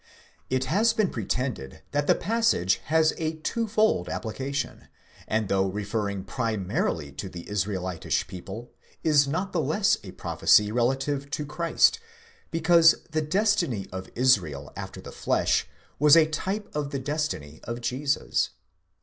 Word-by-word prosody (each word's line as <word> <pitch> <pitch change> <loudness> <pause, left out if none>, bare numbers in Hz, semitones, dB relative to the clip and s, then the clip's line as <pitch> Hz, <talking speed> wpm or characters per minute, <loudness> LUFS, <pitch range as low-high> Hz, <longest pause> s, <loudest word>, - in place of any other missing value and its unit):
It 130 0 0
has 220 +7 +3
been 215 -4 +1
pretended 110 - -3
that 145 0 0
the - - +5
passage 210 - +2
has 160 +1 +3
a 160 0 -1
twofold 215 - 0
application, 135 +5 -4 0.4
and, 110 -1 0
though 95 0 +2
referring 100 0 -3
primarily 100 - -2
to 70 +7 -6
the 85 -2 -9
Israelitish 95 -4 -1
people, 95 +6 -8 0.3
is 145 -3 +4
not 185 +7 -2
the 170 - +1
less 160 +8 +2
a - - -9
prophecy 105 0 +3
relative 135 +4 0
to 150 +1 -3
Christ, 170 - +2 0.5
because 165 0 +5 0.2
the 155 0 +1
destiny 170 - +1
of 95 0 -6
Israel 90 - +2
"after - - -7
the - - -9
flesh" - - +1 0.3
was 150 +2 +7
a 160 - +7
type 190 +7 -3
of 150 -2 -1
the 140 - -3
destiny 135 - -3
of 115 +1 -4
Jesus. 130 +4 0
135 Hz, 140 wpm, -26 LUFS, 100-160 Hz, 0.5 s, was